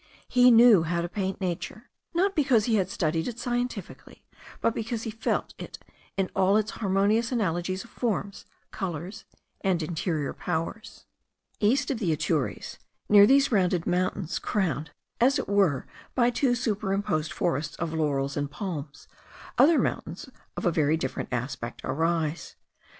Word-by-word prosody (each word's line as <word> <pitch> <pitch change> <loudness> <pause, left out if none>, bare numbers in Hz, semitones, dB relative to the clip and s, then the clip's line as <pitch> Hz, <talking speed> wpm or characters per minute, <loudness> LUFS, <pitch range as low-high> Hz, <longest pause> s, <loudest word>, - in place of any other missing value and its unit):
He 250 0 +5
knew 230 -5 +7
how 170 +1 -1
to 170 - -2
paint 190 +1 -3
nature, 185 +4 -5 0.2
not 390 +3 +2
because 260 -8 +3
he 225 -3 +2
had 190 -2 0
studied 160 -3 -1
it 240 -2 -5
scientifically, 240 -4 -4 0.4
but 230 - +1
because 225 0 -3
he 225 - -4
felt 220 +1 -2
it - - -8 0.4
in 195 -1 0
all 195 +2 +4
its 215 0 0
harmonious 210 +3 +1
analogies 185 -4 -1
of 235 - -17
forms, 205 -4 -2 0.3
colours, 180 0 -5 0.4
and 180 -4 +1
interior 155 -2 -2
powers. 165 +7 -4 0.5
East 260 +7 +2
of 255 - -2
the 185 -8 0
Atures, 155 -2 -2 0.3
near 205 -1 +8
these 275 +2 +4
rounded 180 -5 +2
mountains 180 -1 -1
crowned, 160 -7 -1 0.3
as 265 +4 +4
it - - -3
were, 195 -9 +2 0.3
by 245 -1 +3
two 245 0 +1
superimposed 195 -8 -1
forests 150 -2 -1
of 165 -1 -3
laurels 140 -3 0
and 145 -1 -2
palms, 145 -5 -6 0.5
other 310 +3 +6
mountains - - -2 0.3
of - - -3
a 175 - +4
very 155 -1 +2
different 130 -4 -4
aspect 120 -1 -4
arise. 160 +3 -1
190 Hz, 150 wpm, -27 LUFS, 160-225 Hz, 0.5 s, near